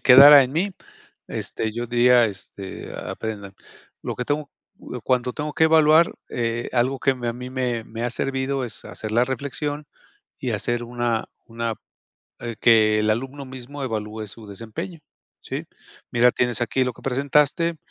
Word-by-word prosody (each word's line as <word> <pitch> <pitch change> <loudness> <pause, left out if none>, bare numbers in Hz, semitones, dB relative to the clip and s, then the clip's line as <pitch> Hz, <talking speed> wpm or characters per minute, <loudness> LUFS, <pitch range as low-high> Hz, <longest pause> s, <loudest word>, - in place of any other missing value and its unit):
quedara 140 +2 +10
en 125 - -3
mí, 180 +6 -1 0.5
este, 110 - -3
yo 120 +2 -4
diría, 120 0 +5
este, 95 -1 -7
aprendan, 100 -3 -6 0.5
lo - - -4
que 125 - -2
tengo, 145 0 -2 0.3
cu 125 - -8
cuando 125 -1 +1
tengo 150 +3 -4
que 160 - +3
evaluar, 160 +1 +5 0.2
eh, 120 0 -2
algo 130 +2 +1
que 135 - +2
me, 120 -2 -4
a - - 0
mí 125 +1 -8
me 125 -3 -2
me 115 +1 -6
ha 120 - 0
servido, 135 +1 -1
es 115 -3 -5
hacer 110 -1 -6
la 120 - +4
reflexión 145 +2 -3 0.5
y - - -3
hacer 120 0 -1
una 120 -1 -1 0.2
una 115 0 -3 0.7
eh, 115 -2 -5
que 110 -2 +5
el 110 0 +2
alumno 135 +5 -2
mismo 130 +2 -8
evalúe 110 -3 -4
su 110 +2 -9
desempeño, 115 - -7 0.4
¿sí? - - -5 0.4
"Mira, 120 +1 +5
tienes 120 -2 0
aquí 130 +3 +1
lo 125 -2 -3
que - - -16
presentaste, 145 +5 +2
125 Hz, 165 wpm, -23 LUFS, 115-135 Hz, 0.7 s, quedara